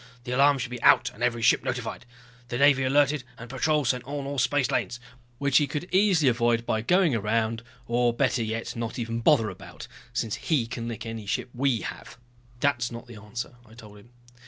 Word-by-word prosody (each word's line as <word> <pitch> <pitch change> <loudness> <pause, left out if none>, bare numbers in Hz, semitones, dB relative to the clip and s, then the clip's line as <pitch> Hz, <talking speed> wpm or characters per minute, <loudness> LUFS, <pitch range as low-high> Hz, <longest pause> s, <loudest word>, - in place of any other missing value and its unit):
The 125 - -6
alarm 140 +2 +4
should 125 -1 -4
be 125 -1 -6
out - - +5
and 110 - -15
every 120 -2 0
ship - - +4
notified. 125 0 -4 0.4
The 120 - -3
Navy 140 0 +5
alerted 145 +1 +2
and 115 +1 -10
patrols 145 0 +1
set 125 -1 0
on 140 +1 -5
all 140 0 -3
spacelanes 130 -3 0 0.2
" 120 -1 -33
"Which 140 0 +2
he 145 - +3
could 150 +5 -4
easily 185 -6 +4
avoid 120 -1 +2
by 110 - 0
going 175 - +3
around, 115 +1 0 0.2
or 120 +1 +2
better 125 0 +1
yet 115 +1 -3
not 115 -1 -4
even 115 -1 -3
bother 115 -3 +3
about, 85 -4 -11 0.2
since 115 -3 -2
he 145 -8 0
can 115 0 -5
lick 115 -2 -6
any 115 -2 -6
ship 125 - -2
we 130 -2 +1
have. - - -8 0.4
That's 125 -3 +1
not 120 +1 -8
the 120 -2 -12
answer," 115 +4 -7
I 110 -1 -18
told 105 -3 -13
him. 100 - -19
120 Hz, 205 wpm, -26 LUFS, 115-140 Hz, 0.4 s, out